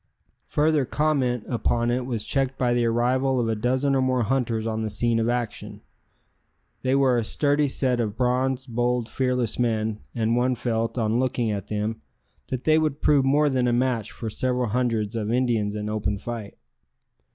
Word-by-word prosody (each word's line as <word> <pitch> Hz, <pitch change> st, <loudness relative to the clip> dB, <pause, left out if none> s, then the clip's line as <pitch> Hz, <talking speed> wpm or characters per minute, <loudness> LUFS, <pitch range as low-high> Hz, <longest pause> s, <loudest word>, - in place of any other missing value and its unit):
Further 150 Hz, -1 st, +2 dB
comment 130 Hz, -4 st, 0 dB
upon 120 Hz, 0 st, 0 dB
it 125 Hz, +1 st, -1 dB
was 115 Hz, -5 st, -3 dB
checked 135 Hz, -1 st, -1 dB
by 125 Hz, -2 st, +1 dB
the 120 Hz, -1 st, +2 dB
arrival 125 Hz, +3 st, +1 dB
of 120 Hz, -, 0 dB
a 115 Hz, -, +1 dB
dozen 130 Hz, +5 st, +1 dB
or 135 Hz, -, +2 dB
more 130 Hz, -1 st, +1 dB
hunters 115 Hz, -2 st, 0 dB
on 110 Hz, -1 st, -2 dB
the 110 Hz, -, -2 dB
scene 115 Hz, +3 st, 0 dB
of 115 Hz, +1 st, +1 dB
action. 120 Hz, -3 st, -3 dB, 1.0 s
They 130 Hz, +1 st, +1 dB
were 135 Hz, -3 st, +3 dB
a 115 Hz, -, +1 dB
sturdy 145 Hz, +5 st, +1 dB
set 130 Hz, -2 st, 0 dB
of 110 Hz, -3 st, -2 dB
bronzed, 130 Hz, +1 st, 0 dB
bold, 120 Hz, 0 st, 0 dB
fearless 125 Hz, -3 st, -1 dB
men, 110 Hz, -3 st, 0 dB, 0.2 s
and 115 Hz, 0 st, +1 dB
one 125 Hz, +1 st, +2 dB
felt, 115 Hz, 0 st, -2 dB
on 115 Hz, 0 st, +1 dB
looking 125 Hz, -3 st, 0 dB
at 100 Hz, -2 st, -4 dB
them, 105 Hz, -2 st, -3 dB, 0.5 s
that 130 Hz, -1 st, -4 dB
they 155 Hz, 0 st, +4 dB
would 155 Hz, -2 st, -1 dB
prove 145 Hz, -2 st, +4 dB
more 145 Hz, +3 st, +3 dB
than 130 Hz, -3 st, +1 dB
a 120 Hz, -, +2 dB
match 120 Hz, -3 st, 0 dB
for 115 Hz, -, -6 dB
several 125 Hz, +2 st, -1 dB
hundreds 115 Hz, -2 st, 0 dB
of 110 Hz, -1 st, -2 dB
Indians 115 Hz, -4 st, +1 dB
in 105 Hz, 0 st, -3 dB
open 105 Hz, -1 st, -1 dB
fight. 110 Hz, -1 st, -7 dB
120 Hz, 185 wpm, -25 LUFS, 115-130 Hz, 1.0 s, they